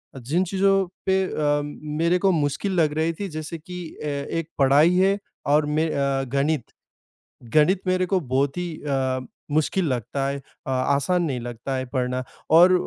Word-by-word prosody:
अ, 135 Hz, -, -7 dB
जिन 155 Hz, +10 st, 0 dB
चीज़ों 195 Hz, +1 st, +2 dB, 0.2 s
पे 190 Hz, 0 st, +3 dB
अ, 145 Hz, -4 st, 0 dB
मेरे 150 Hz, +4 st, -1 dB
को 190 Hz, -, +6 dB
मुश्किल 155 Hz, +5 st, 0 dB
लग 150 Hz, -1 st, +2 dB
रही 160 Hz, +1 st, +1 dB
थी 200 Hz, -, -2 dB
जैसे 155 Hz, +2 st, -5 dB
कि 180 Hz, +2 st, -8 dB, 0.2 s
अ, 150 Hz, -, -2 dB
एक 145 Hz, +3 st, -3 dB
पढ़ाई 145 Hz, +6 st, +5 dB
है 195 Hz, +2 st, +4 dB, 0.4 s
और 150 Hz, -, +3 dB
में 155 Hz, +2 st, +1 dB
अ, 140 Hz, -1 st, 0 dB
गणित। 140 Hz, -2 st, 0 dB, 0.8 s
गणित 175 Hz, +5 st, +4 dB
मेरे 185 Hz, 0 st, +2 dB
को 190 Hz, 0 st, +2 dB
बहुत 135 Hz, +1 st, 0 dB
ही 175 Hz, 0 st, -2 dB, 0.2 s
अ, 130 Hz, -2 st, 0 dB, 0.3 s
मुश्किल 155 Hz, +5 st, +1 dB
लगता 130 Hz, +2 st, -2 dB
है 140 Hz, 0 st, -2 dB
अ, 135 Hz, 0 st, -11 dB
आसान 140 Hz, +7 st, +1 dB
नहीं 130 Hz, -5 st, -2 dB
लगता 120 Hz, +3 st, -5 dB
है 130 Hz, 0 st, -3 dB
पढ़ना 125 Hz, 0 st, 0 dB, 0.3 s
और 175 Hz, +4 st, +8 dB
150 Hz, 175 wpm, -24 LUFS, 135-180 Hz, 0.8 s, और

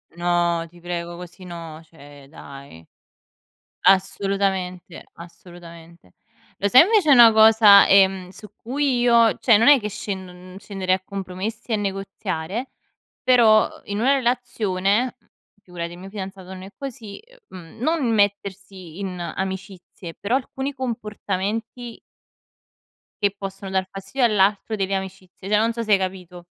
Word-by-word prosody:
No, 175 Hz, -1 st, 0 dB
ti 175 Hz, +1 st, -19 dB
prego 170 Hz, 0 st, -6 dB
così 180 Hz, +1 st, -12 dB
no, 165 Hz, -3 st, -9 dB
cioè 145 Hz, -3 st, -16 dB
dai. 140 Hz, -, -13 dB, 1.0 s
Assolutamente, 195 Hz, -2 st, 0 dB
assolutamente. 170 Hz, -, -14 dB, 0.4 s
Lo 200 Hz, -, -1 dB
sai 255 Hz, -, +8 dB
invece 400 Hz, -4 st, +2 dB
una 240 Hz, -4 st, +8 dB
cosa, 220 Hz, -2 st, +7 dB
ehm, 190 Hz, -2 st, +3 dB
su 210 Hz, +3 st, -13 dB
cui 265 Hz, +1 st, -1 dB
io 235 Hz, -2 st, +4 dB
cioè 230 Hz, -4 st, +5 dB
non 230 Hz, -, +2 dB
è 285 Hz, -2 st, +7 dB
che 210 Hz, -2 st, -5 dB
scend 190 Hz, -2 st, -6 dB
non 180 Hz, +1 st, -14 dB
scenderei 195 Hz, -2 st, -1 dB
a 185 Hz, -, -10 dB
compromessi 200 Hz, +4 st, -6 dB
e -, -, +3 dB
negoziare, 195 Hz, +1 st, -4 dB, 0.5 s
però, 230 Hz, -4 st, +5 dB
ehm, -, -, -14 dB
in 205 Hz, +1 st, -4 dB
una 265 Hz, +4 st, +3 dB
relazione, 240 Hz, -3 st, -1 dB
mhmm- 210 Hz, -, -36 dB, 0.4 s
figurati 170 Hz, -1 st, -7 dB
il 175 Hz, -, -11 dB
mio 190 Hz, +2 st, -11 dB
fidanzato 190 Hz, -2 st, -8 dB
non 185 Hz, -1 st, -9 dB
è 190 Hz, -, -10 dB
così- 240 Hz, -7 st, -8 dB, 0.3 s
ehm, 185 Hz, -, -10 dB, 0.2 s
mhmm, -, -, -18 dB
non 280 Hz, -3 st, 0 dB
mettersi 195 Hz, -4 st, -2 dB
in 190 Hz, -2 st, -5 dB
amicizie, 190 Hz, -1 st, -7 dB
però 205 Hz, +5 st, -3 dB
alcuni 270 Hz, +1 st, -3 dB
comportamenti 225 Hz, -1 st, -5 dB, 1.2 s
che 200 Hz, -1 st, +2 dB
possono 195 Hz, 0 st, -7 dB
dar 190 Hz, -1 st, -1 dB
fastidio 195 Hz, +6 st, -1 dB
all'altro 205 Hz, 0 st, +1 dB
delle 195 Hz, -1 st, -2 dB
amicizie, 190 Hz, 0 st, -7 dB
cioè 210 Hz, -, +3 dB
non 225 Hz, +2 st, +1 dB
so 235 Hz, -, -4 dB
se 215 Hz, -2 st, +1 dB
hai -, -, +6 dB
capito. 185 Hz, -2 st, -6 dB
195 Hz, 145 wpm, -22 LUFS, 180-220 Hz, 1.2 s, sai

